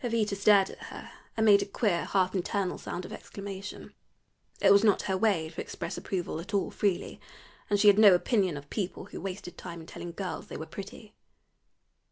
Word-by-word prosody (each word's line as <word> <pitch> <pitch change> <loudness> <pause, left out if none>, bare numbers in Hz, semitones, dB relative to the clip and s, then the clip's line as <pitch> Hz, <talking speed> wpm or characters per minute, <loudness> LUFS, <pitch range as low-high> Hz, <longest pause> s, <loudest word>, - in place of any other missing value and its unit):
Jovita 225 -4 0
stared 200 -1 +4
at - - -12
her - - -9 0.3
and 220 - +3
made 205 -2 +7
a - - -1
queer 200 -4 0
half 185 -1 +1
internal 190 0 -1
sound 180 - -5
of 215 - -8
exclamation. 200 -1 -8 0.7
It - - +5
was 200 +1 +6
not 210 -3 +4
her 190 - 0
way 190 -6 +1
to 160 - -6
express - - -5
approval 175 -4 -3
at 200 +5 -5
all 195 - 0
freely, 195 -4 -1 0.5
and 205 - +2
she 210 - +5
had 205 0 +7
no 205 -4 +9
opinion 185 - +1
of 145 0 -11
people 195 -4 -3
who - - -9
wasted 190 -1 -6
time 170 0 -7
in 160 - -10
telling 170 +1 -8
girls 185 +1 -5
they - - -7
were 160 - -6
pretty. 205 +4 -10
195 Hz, 200 wpm, -29 LUFS, 180-205 Hz, 0.7 s, no